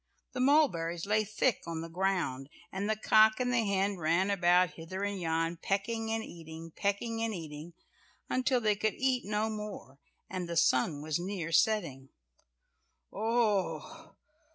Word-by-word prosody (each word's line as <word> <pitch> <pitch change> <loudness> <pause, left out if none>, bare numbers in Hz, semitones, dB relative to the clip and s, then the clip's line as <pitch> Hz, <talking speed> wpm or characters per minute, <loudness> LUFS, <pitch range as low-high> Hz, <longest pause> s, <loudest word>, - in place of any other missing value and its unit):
The 255 - -5
mulberries 190 - +2
lay 215 +1 +2
thick 215 +3 0
on 165 -1 -3
the 165 - -5
ground, 165 -7 -1 0.2
and 200 +2 -3
the 215 - +2
cock 215 +1 +5
and 250 0 0
the 235 -1 +3
hen 200 -1 0
ran 170 +4 +1
about 180 -1 +4
hither 185 +4 -6
and 200 -2 -2
yon, 165 0 0
pecking 220 +5 -2
and 225 0 -1
eating—pecking 175 +7 -4
and 225 -2 -1
eating, 160 0 -8 0.5
until 255 0 +1
they 215 -3 +2
could 215 +1 -1
eat 260 -2 0
no 210 +1 0
more, 210 - -7 0.3
and 180 -2 -5
the 170 - -2
sun 145 +2 +2
was 155 +1 -1
near 175 -2 -4
setting. 165 -7 +1 1.0
"Oh! 220 - -1
195 Hz, 150 wpm, -31 LUFS, 165-220 Hz, 1.0 s, cock